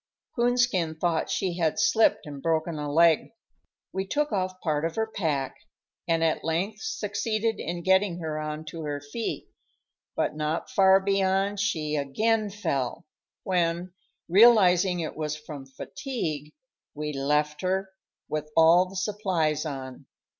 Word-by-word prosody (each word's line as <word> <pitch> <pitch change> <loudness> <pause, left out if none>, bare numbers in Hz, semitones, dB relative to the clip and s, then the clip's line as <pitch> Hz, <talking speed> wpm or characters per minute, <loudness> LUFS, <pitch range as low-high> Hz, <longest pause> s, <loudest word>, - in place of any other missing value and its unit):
Coonskin 240 -9 +2
thought 165 0 0
she 180 -3 -1
had 160 -2 +1
slipped 210 +2 +3
and 145 -2 -8
broken 160 0 0
a 145 -1 -3
leg. 165 +5 +4 0.6
We 190 +1 -2
took 295 +5 0
off 185 -2 -2
part 155 -4 -1
of 165 0 -2
her 220 - +1
pack, 155 -11 -2 0.5
and 165 -1 +2
at 160 -1 +1
length 170 +6 -2
succeeded 220 - -2
in 170 0 -4
getting 190 -1 +3
her 155 -3 -4
on 155 +1 -5
to 165 - -7
her 145 -2 -3
feet; 145 +11 -5 0.7
but - - -1
not 155 +2 -2
far 190 0 +6
beyond 195 +1 +1
she 155 -7 -1
again 215 +10 +1
fell, 165 -6 -3 0.4
when, 175 -1 0 0.3
realizing 185 -3 +5
it 160 - -4
was 150 -1 -3
from 150 -3 -9
fatigue, 155 - -5 0.4
we 150 0 -4
left 150 +2 0
her, 190 +1 -1 0.4
with 150 0 -3
all 170 +3 +6
the 195 - -12
supplies 180 -6 0
on. 130 -3 -7
170 Hz, 140 wpm, -27 LUFS, 155-195 Hz, 0.7 s, far